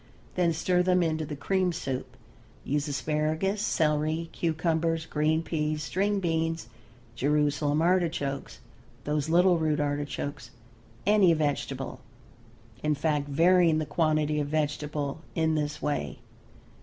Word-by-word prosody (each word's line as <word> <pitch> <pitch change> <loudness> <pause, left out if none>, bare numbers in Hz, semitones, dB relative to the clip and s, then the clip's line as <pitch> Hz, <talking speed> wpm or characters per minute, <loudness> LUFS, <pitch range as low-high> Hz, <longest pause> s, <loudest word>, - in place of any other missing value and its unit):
Then 175 -2 +2
stir 180 +2 +1
them 180 0 +3
into 155 -2 -1
the 150 - -5
cream 185 +5 0
soup. 135 -6 -5 0.5
Use 145 +2 -1
asparagus, 155 +7 -1
celery, 155 -1 0
cucumbers, 165 0 0
green 155 +1 +1
peas, 155 -1 -2
string 200 +5 0
beans, 165 -6 -1 0.4
Jerusalem 145 +3 +1
artichokes, 170 -6 0 0.4
those 150 0 -1
little 175 +1 +4
root 155 -1 +1
artichokes, 145 -2 -3 0.6
any 200 -4 +5
vegetable, 140 -3 -2 0.8
in 150 0 +1
fact, 145 -1 0
varying 165 +2 +4
the 155 - -1
quantity 155 -1 +1
of 145 - -1
vegetable 150 -1 -2
in 160 -1 +2
this 150 -1 -2
way. 145 - -2
155 Hz, 120 wpm, -28 LUFS, 150-165 Hz, 0.8 s, any